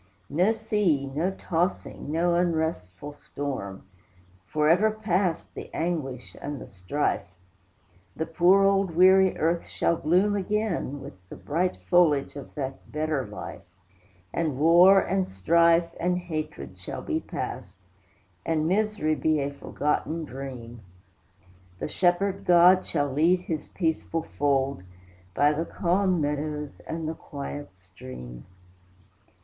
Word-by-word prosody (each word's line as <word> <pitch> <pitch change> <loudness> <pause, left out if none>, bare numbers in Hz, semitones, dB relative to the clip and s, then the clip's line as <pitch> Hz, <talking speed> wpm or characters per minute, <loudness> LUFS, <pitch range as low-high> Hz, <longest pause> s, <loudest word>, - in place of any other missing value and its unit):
No 180 +9 +3
sea, 210 -10 +1
no 150 +7 -1
tossing, 180 -5 -2
no 170 +2 +2
unrestful 160 - -1
storm! 135 -10 -6 0.6
Forever 165 - +3
past 195 -5 -1
the - - -8
anguish 150 -7 -3
and 145 -1 -5
the - - -8
strife; 100 +10 -2 0.9
The 160 - -2
poor 180 +4 +4
old 195 -3 +2
weary 190 +1 +6
earth 165 +2 0
shall 170 - 0
bloom 180 +7 +2
again, 200 -8 -2
With - - -9 0.2
the - - -8
bright 175 +5 -1
foliage 155 -7 +3
of 140 - -10
that 135 -2 -6
better 150 -3 -1
life. - - -8 0.7
And 155 -6 -1
war, 175 +6 +7
and 190 0 -1
strife, 170 - +3
and 180 +1 +1
hatred, 155 - -5
shall - - -6
be - - -1
past, 95 +2 -6 0.7
And 160 -1 0
misery 210 -4 +1
be 155 0 +1
a 140 0 -2
forgotten 150 +3 -2
dream. 125 -4 -8 1.0
The - - -4
Shepherd 185 +4 +1
God 180 +1 +6
shall 145 -4 -1
lead 170 +5 +3
his 160 -4 -4
peaceful 165 -1 -2
fold 140 -5 0 0.5
By 145 +1 +4
the 155 +2 -1
calm 185 +1 +1
meadows 150 0 -3
and 160 -1 -4
the 160 - -2
quiet 145 - -8
stream. 65 -10 -11
160 Hz, 125 wpm, -26 LUFS, 145-180 Hz, 1.0 s, war